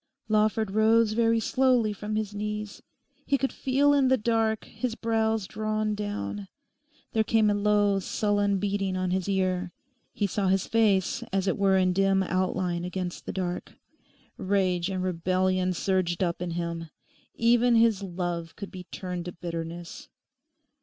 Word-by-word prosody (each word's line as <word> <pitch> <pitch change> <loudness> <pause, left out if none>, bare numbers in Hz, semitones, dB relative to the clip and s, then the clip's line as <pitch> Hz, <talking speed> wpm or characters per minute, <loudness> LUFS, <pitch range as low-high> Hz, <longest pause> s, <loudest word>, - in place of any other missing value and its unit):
Lawford 215 -1 +2
rose 220 +1 +4
very 230 0 +3
slowly 245 -2 +2
from 210 +1 -5
his 215 -1 -2
knees. 210 0 -4 0.4
He 280 - +1
could 270 0 -1
feel 280 +2 +2
in 275 -2 +4
the 260 0 +4
dark 220 -1 0
his 250 -3 -4
brows 225 -2 0
drawn 215 +1 -2
down; 205 -1 -4 0.7
there 220 - +3
came 220 -1 +3
a - - +2
low, 205 -1 +2
sullen 205 +1 0
beating 195 -1 -1
on 185 -1 -1
his 190 +1 -1
ear; 185 -2 0 0.4
he 205 - -1
saw 200 0 -1
his 190 0 +2
face 210 -5 +2
as 195 0 0
it 190 - +2
were 195 -1 +3
in 185 -1 +2
dim 195 0 +3
outline 185 -1 -1
against 180 0 -5
the - - -2
dark. 180 -2 -4 0.6
Rage 185 -2 0
and 185 -1 -2
rebellion 185 +1 +1
surged 185 0 0
up 170 -1 -2
in 180 - -2
him; 170 -1 -4 0.5
even 240 +1 +4
his 225 -3 +4
love 175 -3 -4
could 200 - -8
be 180 -1 -9
turned 180 0 -5
to 180 - -4
bitterness. 170 - -7
200 Hz, 155 wpm, -27 LUFS, 185-220 Hz, 0.7 s, rose